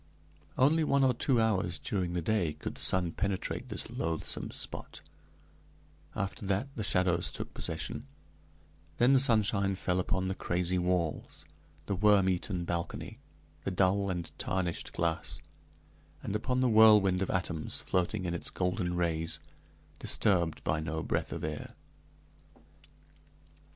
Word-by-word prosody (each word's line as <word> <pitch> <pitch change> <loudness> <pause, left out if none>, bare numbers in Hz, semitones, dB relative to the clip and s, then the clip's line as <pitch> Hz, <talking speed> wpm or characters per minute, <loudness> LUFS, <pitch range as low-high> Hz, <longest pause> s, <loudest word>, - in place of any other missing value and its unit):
Only 155 +5 +4
one 140 -2 +3
or 130 -1 +4
two 125 +1 +1
hours 95 -6 +1
during 90 -4 -2
the 90 -2 -1
day 90 -6 +1
could - - -6
the - - -12
sun 90 -2 +2
penetrate 100 +1 -3
this - - -3
loathsome 80 -1 -2
spot; - - -5 1.1
after 100 +1 -3
that, 100 +8 0
the 110 - -3
shadows 90 -3 +1
took - - -6
possession; - - -4 0.9
then 125 +3 +5
the 135 - +6
sunshine 105 -6 +3
fell 90 -1 0
upon 95 0 0
the 95 - -1
crazy 90 -1 0
walls, 90 -3 -1 0.4
the 100 - -1
worm 100 0 +4
eaten 90 -1 -1
balcony, 85 0 -4 0.4
the - - -1
dull 95 +2 +2
and 90 -2 -3
tarnished 90 -3 -2
glass, 85 -1 -1 0.8
and 100 - -3
upon 125 +4 0
the 130 - +4
whirlwind 105 -4 +6
of 95 - -1
atoms 90 -4 0
floating 95 +2 -1
in 85 - -1
its 85 - -3
golden 90 -1 -1
rays, 80 -2 -1 0.6
disturbed 85 -5 +1
by 80 - 0
no 80 0 -3
breath - - -1
of - - -5
air. 75 -1 -5
95 Hz, 140 wpm, -31 LUFS, 85-105 Hz, 1.1 s, the